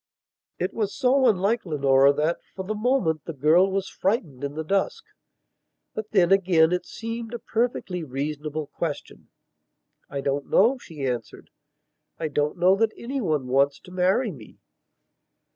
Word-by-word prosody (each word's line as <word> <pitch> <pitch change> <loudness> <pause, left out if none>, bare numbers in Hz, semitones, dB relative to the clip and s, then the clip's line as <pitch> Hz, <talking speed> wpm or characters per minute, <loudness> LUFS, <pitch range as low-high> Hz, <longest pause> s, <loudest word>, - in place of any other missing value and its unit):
It 180 - -2
was 210 -3 -2
so 260 0 +3
unlike 210 +2 +2
Leonora 140 -4 +4
that, 155 +4 0 0.2
for 190 - -5
the 215 - -2
moment, 215 - 0
the 165 - -5
girl 160 +7 +4
was 195 0 -1
frightened 175 - -2
in 140 +1 -4
the 160 - -3
dusk. 195 +4 -1 0.9
But 215 0 -5
then, 185 -4 +3
again, 175 -4 +4
it 180 0 -1
seemed 230 +1 -6
a - - -2
perfectly 225 -7 -2
reasonable 150 +2 -4
question. 150 +1 -6 0.8
"I 140 0 -4
don't 140 0 -2
know," 245 +7 +4
she 150 - -7
answered. 120 -4 -5 0.7
"I 160 -2 -3
don't 150 +3 -1
know 180 +2 +5
that 225 +1 +1
anyone 215 - -2
wants 140 +2 +2
to 180 - -14
marry 190 +6 +1
me." 125 -10 -13
175 Hz, 150 wpm, -25 LUFS, 145-215 Hz, 0.9 s, know